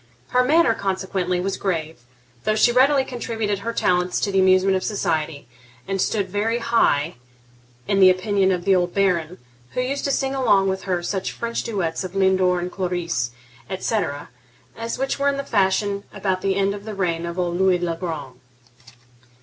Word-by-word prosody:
Her 250 0 +3
manner, 295 -2 +4
consequently, 190 -3 -2
was 190 +2 -2
grave, 165 -6 -3 0.4
though 215 - +1
she 230 +2 +4
readily 265 +2 +4
contributed 225 -5 -3
her 230 +3 -3
talents 180 -4 +1
to 200 - 0
the 195 - +2
amusement 190 +1 +4
of 185 - -1
society, 160 - -2 0.4
and 195 -1 -1
stood 200 -3 0
very 210 +5 0
high 180 - +1 0.7
in 200 -1 +2
the 190 -1 +8
opinion 190 +1 +2
of 180 -1 -2
the 195 -1 +4
old 175 -1 0
Baron, 180 -3 +1 0.4
who - - -2
used 270 +3 -2
to 280 - +1
sing 270 0 0
along 210 -8 +3
with 190 0 -3
her 180 -2 -1
such 190 +1 -2
French 235 0 -3
duets 190 -6 -2
of 185 0 -7
Lindor 190 -2 +3
and 180 +1 -4
Cloris, 175 -9 -2 0.4
etc., 190 -6 -2 0.5
as 230 +1 -4
were 275 +2 0
in 275 0 -2
fashion 200 0 +1
about 190 -2 -2
the 195 -1 0
end 200 0 +1
of 200 0 -8
the 215 -1 -6
reign 170 -3 -1
of 170 +1 -6
old 175 -1 -1
Louis 190 -1 +4
le 175 -1 -2
Grand. 155 -7 -6
190 Hz, 175 wpm, -22 LUFS, 180-215 Hz, 0.7 s, the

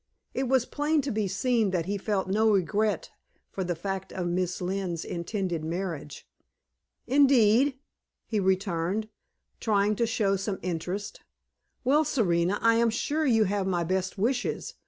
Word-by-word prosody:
It 260 0 -1
was 260 -1 +3
plain 300 +1 0
to 275 0 -3
be 215 -1 0
seen 225 +2 +1
that 175 -3 -1
he 200 +3 -2
felt 200 -1 -1
no 215 +3 +3
regret 210 +2 +1 0.4
for 190 - -3
the 175 -1 -2
fact 195 +3 -4
of 185 - -3
Miss 180 +1 -1
Lynne's 180 -2 -3
intended 175 -2 -3
marriage. 165 -3 -5 0.8
"Indeed?" 265 -1 +4 0.5
he 215 - -1
returned, 190 +1 0 0.5
trying 210 -1 +2
to 235 - +1
show 200 -3 +1
some 195 0 -3
interest. 180 +4 -4 0.6
"Well, 285 +5 +4
Serena, 180 - +1
I 230 0 +5
am 235 0 +3
sure 295 +7 -1
you 225 -4 +4
have 200 -1 -1
my 175 -2 0
best 185 +3 -1
wishes. 245 +5 -1
200 Hz, 150 wpm, -27 LUFS, 185-230 Hz, 0.8 s, I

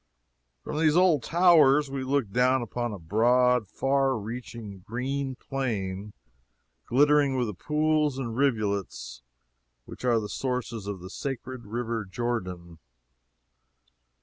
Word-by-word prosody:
From 150 0 -4
these 155 0 +3
old 180 -6 +4
towers 150 -5 +5
we 135 -1 -3
looked 130 -6 -1
down 125 +1 +3
upon 120 +1 -3
a 105 - -5
broad, 120 +6 +2
far 135 +2 +1
reaching 110 -2 -7
green 130 +6 -3
plain, 105 -7 -4 0.7
glittering 145 +1 +4
with 125 - +1
the 105 - -4
pools 150 - +1
and 120 -4 -4
rivulets 100 - -1 0.6
which - - -11
are 120 -2 +3
the 105 - -4
sources 120 -3 -3
of 100 -3 -5
the 90 - -8
sacred 130 -2 -6
river 115 0 -3
Jordan. 90 -6 -4
125 Hz, 120 wpm, -27 LUFS, 105-135 Hz, 0.7 s, towers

